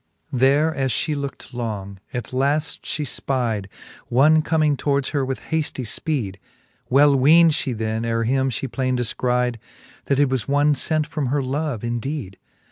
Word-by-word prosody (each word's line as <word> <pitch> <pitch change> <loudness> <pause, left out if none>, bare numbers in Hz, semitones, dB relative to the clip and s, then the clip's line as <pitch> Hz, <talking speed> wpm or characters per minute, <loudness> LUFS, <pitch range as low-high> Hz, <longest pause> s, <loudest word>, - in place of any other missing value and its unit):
VIII. 125 - -2
There 145 +5 +4
as 135 -3 -1
fhe 150 +7 -1
looked 140 -3 -6
long, 105 -5 -5
at 125 +1 -5
laft 145 +4 0
fhe 150 - -2 0.2
fpide 115 -7 -1 0.4
One 150 +6 +5
comming 155 -2 +2
towards 140 0 0
her 145 -2 0
with 130 0 -2
hafty 155 -4 -1
fpeede: 115 - -2 0.5
Well 140 +2 +5
weend 160 +5 +6
fhe 135 -6 -1
then, 110 +1 -2
ere 115 0 0
him 130 +3 +1
fhe 130 +1 -4
plaine 130 -2 0
defcride^ 125 0 0 0.5
That 140 - +1
it 145 0 +4
was 130 -4 -1
one 145 +1 +3
fent 155 +2 0
from 145 -3 -3
her 140 +2 0
love 135 -2 -2
indeede. 120 -2 -4
135 Hz, 165 wpm, -22 LUFS, 120-145 Hz, 0.5 s, weend